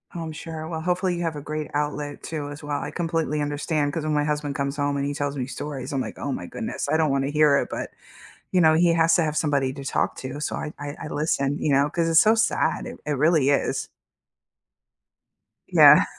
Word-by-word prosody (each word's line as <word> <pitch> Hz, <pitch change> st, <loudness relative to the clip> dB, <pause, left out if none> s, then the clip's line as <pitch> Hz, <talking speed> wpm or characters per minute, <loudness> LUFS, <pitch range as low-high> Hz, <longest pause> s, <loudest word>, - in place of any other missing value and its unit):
Oh, 170 Hz, -, -4 dB
I'm 160 Hz, -, -5 dB
sure, 160 Hz, 0 st, -7 dB
well, 160 Hz, -1 st, -4 dB
hopefully 180 Hz, +1 st, 0 dB
you 175 Hz, -, -4 dB
have 165 Hz, -2 st, -2 dB
a 145 Hz, -, -6 dB
great 155 Hz, +1 st, -4 dB
outlet 145 Hz, 0 st, -3 dB
too 150 Hz, -3 st, -4 dB
as 145 Hz, +1 st, -9 dB
well, 145 Hz, -1 st, -2 dB
I -, -, -4 dB
completely 165 Hz, -3 st, -1 dB
understand 145 Hz, 0 st, -1 dB
'cause 165 Hz, -, -2 dB
when 155 Hz, -1 st, -1 dB
my 150 Hz, 0 st, +2 dB
husband 150 Hz, -1 st, -2 dB
comes 140 Hz, 0 st, -2 dB
home 145 Hz, 0 st, 0 dB
and 140 Hz, -, -1 dB
he 145 Hz, -, -2 dB
tells 145 Hz, 0 st, -3 dB
me 125 Hz, -, -1 dB
stories, 140 Hz, -1 st, -6 dB
I'm, 135 Hz, -, 0 dB
like, -, -, -6 dB
"Oh -, -, -3 dB
my -, -, -4 dB
goodness, -, -, -4 dB
I 155 Hz, -, +3 dB
don't 155 Hz, -3 st, +2 dB
want 135 Hz, 0 st, +1 dB
to 140 Hz, -, -2 dB
hear 150 Hz, -2 st, +5 dB
it," -, -, -2 dB
but, -, -, -5 dB, 0.6 s
you 180 Hz, -, +3 dB
know, 160 Hz, -1 st, +6 dB
he 170 Hz, +1 st, +4 dB
has 165 Hz, 0 st, +4 dB
to 175 Hz, -, +3 dB
have 155 Hz, -1 st, -1 dB
somebody 140 Hz, -4 st, +1 dB
to 140 Hz, -1 st, -8 dB
talk -, -, 0 dB
to, 130 Hz, +3 st, -6 dB
so -, -, -2 dB
I 150 Hz, -, -4 dB
I 145 Hz, 0 st, -5 dB
I -, -, -5 dB
listen, 145 Hz, -2 st, 0 dB
you 150 Hz, -, +1 dB
know, 140 Hz, +1 st, +4 dB
'cause 165 Hz, +2 st, 0 dB
it's 165 Hz, 0 st, +5 dB
so 220 Hz, +1 st, +5 dB
sad, 220 Hz, -1 st, +1 dB
it -, -, -8 dB
it 150 Hz, -, 0 dB
really 150 Hz, 0 st, +3 dB
is. 140 Hz, -, 0 dB, 1.8 s
Yeah. -, -, +8 dB
150 Hz, 240 wpm, -24 LUFS, 145-160 Hz, 1.8 s, Yeah